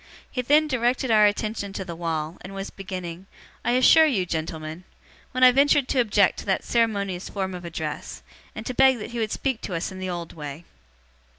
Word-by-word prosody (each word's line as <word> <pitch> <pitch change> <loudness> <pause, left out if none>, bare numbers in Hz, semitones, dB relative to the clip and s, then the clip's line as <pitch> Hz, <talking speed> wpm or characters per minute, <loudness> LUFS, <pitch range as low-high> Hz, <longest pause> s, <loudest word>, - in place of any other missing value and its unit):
He 250 - -1
then 295 +5 +4
directed 255 -2 0
our 215 -1 +6
attention 205 -1 -2
to 190 - -5
the 170 -2 -6
wall, 165 -1 -3
and 195 +2 -9
was 195 0 -5
beginning, 185 -2 -7 0.4
'I - - +1
assure 315 +5 +6
you, 205 -11 +1
gentlemen,' 160 0 -4 0.5
when 255 +1 0
I 255 - +9
ventured 280 +1 +3
to 265 - +1
object 205 -5 +3
to - - -8
that 190 - +1
ceremonious 200 -6 0
form 190 -2 -3
of 180 -1 -7
address, 160 -2 -5 0.3
and 220 - -7
to 255 - -3
beg 265 0 +5
that 215 - -7
he 235 - -4
would 220 -2 -1
speak 265 -5 -2
to 180 - -4
us 165 - -3
in 190 - -8
the 185 0 -4
old 175 -2 -5
way. 150 +1 -7
200 Hz, 205 wpm, -25 LUFS, 175-245 Hz, 0.5 s, I